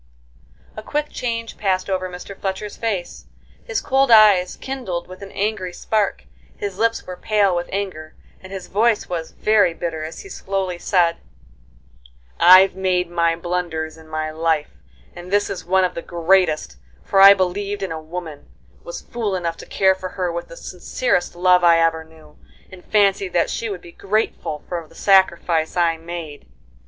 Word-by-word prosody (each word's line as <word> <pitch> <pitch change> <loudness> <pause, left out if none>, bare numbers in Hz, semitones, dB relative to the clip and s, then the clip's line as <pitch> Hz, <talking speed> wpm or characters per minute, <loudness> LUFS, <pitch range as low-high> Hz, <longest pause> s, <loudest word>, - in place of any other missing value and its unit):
A 215 - -6
quick 295 +6 -2
change 230 -2 -4
passed 185 -2 0
over 185 -1 -2
Mr. 180 +2 -9
Fletcher's 195 +2 -4
face; 200 -6 -4 0.4
his 475 -4 -2
cold 270 0 +2
eyes 210 -5 +6
kindled 250 -11 -5
with 185 +1 -12
an 195 - -9
angry 200 -3 -2
spark, 210 +2 -1 0.3
his 200 -1 -5
lips 230 0 +1
were 180 - -7
pale 200 -1 +1
with 175 0 -3
anger, 185 -6 -5 0.3
and 190 - -12
his 190 -2 -6
voice 220 +2 +1
was 165 -2 -4
very 205 -6 +2
bitter, 165 -2 -4
as 160 +1 -7
he 400 - -12
slowly 190 - -3
said: 170 -3 +2 1.2
"I've 185 +2 +8
made 180 -2 0
many 170 -1 +1
blunders 170 -3 -3
in 160 -1 -16
my 155 0 -3
life, 160 -1 0 0.4
and 175 +1 -10
this 205 0 +1
is 195 - -6
one 190 +1 +3
of 180 - 0
the 170 - -5
greatest; 175 -1 +1 0.3
for 195 - +2
I 200 +1 +10
believed 200 +2 -2
in 190 - -3
a 160 -1 -5
woman, 160 -2 -8 0.3
was - - -7
fool 225 -5 -3
enough 170 -2 -3
to - - -11
care 190 -1 +3
for 185 0 -7
her 180 -2 -2
with 170 0 -5
the 170 - -12
sincerest 180 0 -2
love 180 0 +4
I 170 -1 +6
ever 165 -1 +1
knew, 160 -1 -19 0.3
and 185 -1 -12
fancied 195 -3 +2
that 170 - +1
she 230 - -3
would 190 -4 -5
be 170 - -13
grateful 195 -7 -2
for 170 -3 -5
the - - -20
sacrifice 175 -4 +2
I 170 -2 +2
made." 165 - -8
185 Hz, 175 wpm, -21 LUFS, 170-200 Hz, 1.2 s, I